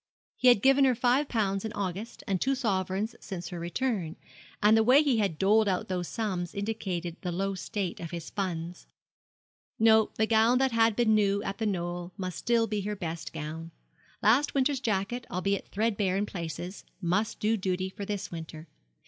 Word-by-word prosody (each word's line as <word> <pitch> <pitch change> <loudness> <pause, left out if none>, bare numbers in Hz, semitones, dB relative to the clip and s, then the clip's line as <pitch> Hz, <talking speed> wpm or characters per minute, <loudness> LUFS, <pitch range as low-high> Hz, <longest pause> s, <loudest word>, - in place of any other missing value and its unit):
He 255 - +2
had 240 -5 +6
given 270 +1 +6
her 255 -2 +3
five 255 +4 +2
pounds 195 -4 0
in 220 - -3
August, 200 +4 -4
and 190 -2 -1
two 270 +1 +2
sovereigns 200 -3 -1
since 180 -3 -6
her 175 - -6
return, 175 -1 -2 0.4
and 210 +1 +5
the 225 - +5
way 260 +6 +6
he 265 -6 +2
had 195 -7 0
doled 210 +4 +4
out 185 -1 -1
those 180 -2 -2
sums 185 -6 -3
indicated 190 -5 -3
the 180 - -3
low 195 +3 -1
state 195 0 -4
of 165 - -6
his 170 -2 -7
funds. 175 -3 -4 0.9
No, 220 -1 +5
the 220 - +2
gown 225 +2 +4
that 265 0 +2
had 225 -1 +3
been 230 -2 +3
new 200 -1 +2
at 195 - -4
The 220 - 0
Knoll 175 -2 -3
must 185 -3 -4
still 235 -1 +2
be 210 -2 -2
her 210 +1 -3
best 165 -4 -5
gown. 160 +2 -6 0.5
Last 250 +9 +4
winter's 270 0 +2
jacket, 230 +1 -2
albeit 195 +2 -1
threadbare 205 -3 0
in 205 - 0
places, 175 0 -6 0.2
must 195 +4 0
do 220 +2 +2
duty 185 -2 -1
for 190 +2 -7
this 200 -1 -4
winter. 160 -1 -8
200 Hz, 185 wpm, -29 LUFS, 180-225 Hz, 0.9 s, had